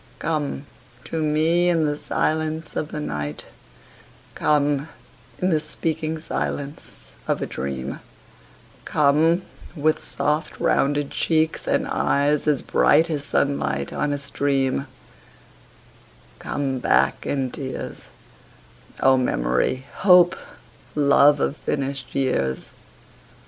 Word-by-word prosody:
Come 150 -3 -2 0.4
to 160 - -3
me 160 +3 +2
in 165 -2 +2
the 145 -1 0
silence 155 +2 -1
of 150 - -3
the 150 - -4
night; 75 - -4 0.9
Come 145 0 +1 0.5
in 185 +1 0
the 155 - +3
speaking 160 0 -2
silence 145 - -5 0.2
of - - 0
a - - -2
dream; 65 0 -5 0.8
Come 155 +5 +3 0.3
with 155 0 +1
soft 150 +2 -1
rounded 145 0 +1
cheeks 160 -1 0
and - - +1
eyes 145 +2 +1
as 145 -3 +2
bright 160 +3 +3
As 145 -2 -1
sunlight 70 - -1
on 150 - -1
a 145 - -1
stream; 140 -1 0 1.5
Come 135 -2 -2
back - - +2
in 135 -3 -1
tears, 130 -1 -6 1.0
O 135 0 +5
memory, 125 - 0
hope, 180 -2 +6 0.6
love 145 0 +5
of 140 - 0
finished 135 -2 -3
years. 95 - 0
145 Hz, 105 wpm, -23 LUFS, 135-155 Hz, 1.5 s, hope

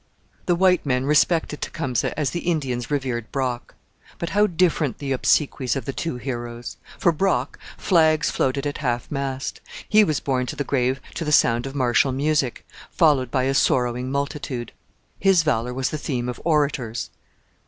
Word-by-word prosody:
The 175 - +3
white 180 0 +3
men 130 -2 0
respected 150 +1 +2
Tecumseh 125 -3 -2
as 145 -4 0
the 175 - -2
Indians 135 -9 -2
revered 130 -6 -2
Brock. 130 -3 -3 0.4
But 170 - -4
how 205 +1 +4
different 165 - +1
the 140 -2 -4
obsequies 130 -2 +1
of 135 -4 -4
the 135 - -3
two 165 -1 -3
heroes! 120 -2 -6 0.2
For 170 - +3
Brock 155 -6 0 0.2
flags 160 -4 +3
floated 135 +2 0
at 145 - -3
half 125 -5 -2
mast. 135 -2 -3 0.3
He 215 0 +6
was 155 -7 0
borne 130 -2 -1
to - - -4
the 145 - -2
grave 130 -1 0
to 170 - -4
the 150 - -2
sound 120 -3 +3
of 135 - -8
martial 130 +1 +2
music, 140 -1 0 0.2
followed 145 -7 +3
by 130 +1 0
a 135 +1 +1
sorrowing 125 -1 +1
multitude. 140 -3 -3 0.5
His 190 -3 +4
valour 125 -5 0
was 130 +1 -2
the 155 - -3
theme 125 -4 -2
of 125 - -5
orators. 145 -7 0
135 Hz, 170 wpm, -23 LUFS, 125-155 Hz, 0.5 s, He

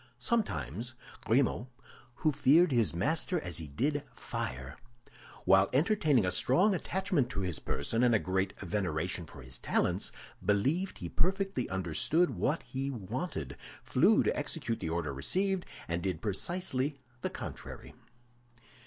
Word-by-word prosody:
Sometimes, 120 - -1 0.3
Grimaud, 125 0 +2 0.6
who 155 - +6
feared 150 +4 +5
his 120 -5 +3
master 160 - +1
as 90 - -4
he 80 -2 -6
did 140 - 0
fire, 65 +2 -4 0.7
while 95 0 +6
entertaining 150 - +3
a 90 - +1
strong 175 - +4
attachment 185 -7 0
to 100 - -3
his 90 -4 -2
person 115 +12 -1
and 120 -2 +5
a - - +7
great 95 -1 -1
veneration 90 -3 -2
for 65 - -11
his 65 -1 -5
talents, - - 0 0.3
believed 135 - +1
he - - -5
perfectly 195 -7 0
understood 95 - +1
what 130 - 0
he 135 +1 -3
wanted, 115 - -4 0.3
flew - - +4
to - - +1
execute 115 - -2
the 80 - -3
order 80 -3 -1
received, 185 - 0 0.2
and 85 +1 -1
did 90 -4 -1
precisely 140 - -1 0.2
the - - -1
contrary. - - -8
120 Hz, 135 wpm, -32 LUFS, -, 0.7 s, a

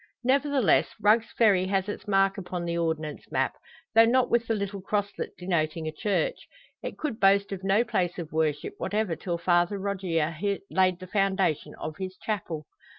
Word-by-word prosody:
Nevertheless, 270 - +3
Rugg's 220 +2 +3
Ferry 195 -5 +4
has 190 0 0
its 205 - -6
mark 195 -1 +3
upon 180 -2 -4
the 170 0 -2
Ordnance 160 -3 -3
map, - - +1 0.4
though 225 0 +7
not 255 +2 +3
with 235 -1 +2
the 225 - +1
little 200 -1 -4
crosslet 205 +1 -3
denoting 165 -3 -1
a - - -2
church. 210 - -1 0.3
It - - -6
could 285 -8 -3
boast 200 +1 +4
of 190 -1 -5
no 195 +4 +3
place 180 -6 -1
of 170 -4 -6
worship 155 -2 -1
whatever 210 -5 -1
till 170 +1 -3
Father 175 +3 +2
Rogier 180 -5 -1 0.4
laid 185 -2 +2
the 185 - -8
foundation 190 -4 0
of 155 0 -6
his 185 0 -5
chapel. 170 -8 -4
190 Hz, 170 wpm, -27 LUFS, 170-210 Hz, 0.4 s, though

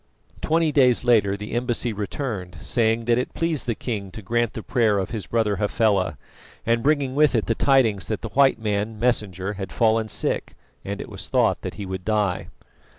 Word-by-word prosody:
Twenty 160 0 +2
days 130 -5 +4
later 105 -5 +3
the 105 +1 -7
embassy 120 -1 -1
returned 100 - -4
saying 115 +2 +1
that 120 +1 +3
it 125 - -4
pleased 165 -6 -1
the 115 - 0
king 105 -5 -4
to 110 - -8
grant 120 +2 0
the 110 - -6
prayer 110 -4 +2
of 95 -2 -2
his 110 -4 -5
brother 110 -4 +1
Hafela, 100 - +1 0.5
and 115 +1 +2
bringing 140 -1 +1
with 150 -1 +3
it 110 - +1
the 115 - +1
tidings 115 -6 +2
that 110 - -3
the 115 - -4
white 135 +3 +4
man, 105 0 -2
Messenger, 105 -5 0
had 95 -2 -6
fallen 110 -1 +2
sick, - - -2 0.3
and 100 0 -4
it - - -7
was - - -8
thought - - +2
that - - -5
he 100 - -6
would 95 -1 -5
die. 105 -3 0
110 Hz, 195 wpm, -23 LUFS, 100-120 Hz, 0.5 s, days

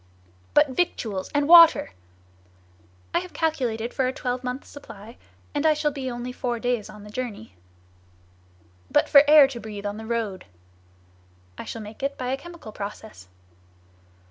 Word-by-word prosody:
"But 295 -1 +5
victuals 230 - -2
and 290 0 +1
water?" 335 -1 +7 1.2
"I - - +3
have 365 0 -9
calculated 245 -8 -2
for 260 -2 0
a - - 0
twelvemonth's 250 0 -4
supply, 230 -5 -12 0.4
and 290 0 -1
I 310 -1 +4
shall 300 0 0
be 270 -2 -5
only 240 0 -5
four 245 -1 -3
days 245 -3 -2
on 210 -1 -12
the 210 - -12
journey." 210 - -6 1.4
"But - - +3
for 280 -1 +8
air 300 -2 +8
to 245 -3 -7
breathe 210 -2 -8
on 205 +1 -3
the 220 0 -8
road?" 220 -6 -3 1.1
"I - - -8
shall 225 - -7
make 210 +4 -11
it 280 +1 -2
by 250 -1 -4
a 265 - -1
chemical 340 -6 -11
process." 205 - -9
250 Hz, 155 wpm, -24 LUFS, 220-285 Hz, 1.4 s, for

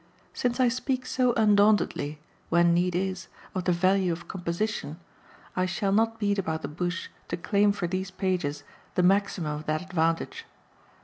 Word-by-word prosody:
Since 245 0 -1
I 255 - +5
speak 255 +1 -1
so 255 -1 +2
undauntedly, 205 -8 +3 0.3
when 170 0 +4
need 175 +1 +1
is, 185 0 -2 0.3
of 185 -2 -3
the 180 - +3
value 185 +1 +2
of 170 +1 -5
composition, 175 -2 -3 0.6
I 185 0 +1
shall 195 +2 -1
not 225 +2 +2
beat 205 -1 +1
about 160 -4 -2
the - - -2
bush 175 +4 -3 0.2
to - - -3
claim 205 +4 +3
for 200 -3 -2
these 185 +2 -2
pages 180 -7 -2 0.3
the 180 - +3
maximum 190 -4 +2
of 155 - -9
that 155 +2 0
advantage. 170 - -1
185 Hz, 165 wpm, -27 LUFS, 170-205 Hz, 0.6 s, I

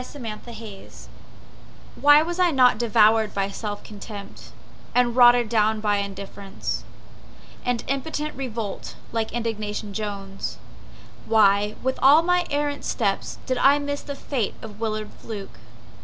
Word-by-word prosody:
Alfred 275 +1 -10
Moir 220 -2 -8 1.0
Why 290 +1 +6
was 345 +2 -4
I 360 -1 +5
not 255 -7 +4
devoured 220 -2 +4
by 195 0 0
self 205 0 -5
contempt, 205 -1 -10 0.4
And 245 -1 +3
rotted 245 -1 +6
down 215 -1 +2
by 210 -1 +1
indifference 200 0 -5 0.8
And 245 -2 -1
impotent 300 +3 -2
revolt 230 -6 -5 0.2
like 225 -1 -1
Indignation 215 -3 -3
Jones? 200 -2 -5 0.7
Why, 210 -1 +4
with 260 0 -1
all 285 +4 +7
of - - -7
my 360 0 +2
errant 290 0 -1
steps 200 -5 -1
Did 255 -1 -1
I 280 +1 +6
miss 285 0 -3
the 285 - -6
fate 255 -7 -2
of 215 -2 -9
Willard 215 -1 -3
Fluke? 200 - -8
225 Hz, 135 wpm, -24 LUFS, 210-265 Hz, 1.0 s, all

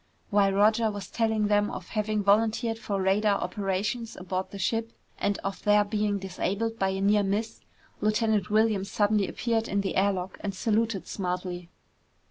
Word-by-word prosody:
While 200 -1 +3
Roger 215 +3 +3
was 205 -2 -7
telling 220 -2 +1
them 205 0 +2
of 180 - -7
having 215 -1 -1
volunteered 225 +3 +2
for 205 -4 -2
radar 200 +2 +2
operations 205 +4 -2
aboard 185 0 -3
the 200 - -8
ship 225 +3 -1 0.3
and 200 0 0
of 195 0 -4
their 210 0 +5
being 210 -1 0
disabled 200 +4 -3
by 195 - +2
a 190 0 -2
near 205 +1 +4
miss, 205 +3 -2 0.4
Lieutenant 215 -2 +1
Williams 210 -2 +2
suddenly 205 -1 +2
appeared 230 -1 -1
in 200 0 0
the 195 - -3
air 200 +2 +3
lock 185 -1 -5
and 200 -2 -3
saluted 220 -1 0
smartly. 180 -2 -4
205 Hz, 165 wpm, -27 LUFS, 195-220 Hz, 0.4 s, their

